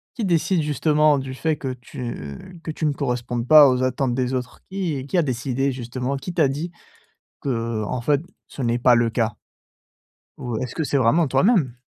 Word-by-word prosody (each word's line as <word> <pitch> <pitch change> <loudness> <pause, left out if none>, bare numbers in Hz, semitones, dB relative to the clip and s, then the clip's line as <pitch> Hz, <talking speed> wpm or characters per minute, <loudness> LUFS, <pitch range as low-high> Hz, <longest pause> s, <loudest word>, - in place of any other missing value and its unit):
Qui 235 -4 -2
décide 175 0 +2
justement 150 0 +3
du 130 0 -6
fait 155 +4 0
que 135 -2 -4
tu 120 - -8
que 160 - -4
tu 155 - -3
ne 150 - +2
correspondes 125 -3 -2
pas 150 -1 +9
aux 125 0 +1
attentes 130 -1 0
des 130 0 -1
autres? 125 -1 -4
Qui 170 -9 -3
qui 180 - -1
a - - +5
décidé 135 -1 -1
justement, 125 +2 -3
qui 175 +6 -6
t'a 160 -5 +3
dit 155 +6 -4 0.7
qu'en 115 -3 -2
fait 145 +2 +2 0.3
ce 135 - -7
n'est 120 0 +1
pas 125 0 +5
le 120 -1 +2
cas? 115 -1 0 1.0
Ou 120 -3 -4
est-ce 125 +1 -4
que 160 - -1
c'est 145 - 0
vraiment 140 +6 +3
toi-même? 165 - +2
130 Hz, 185 wpm, -23 LUFS, 125-155 Hz, 1.0 s, pas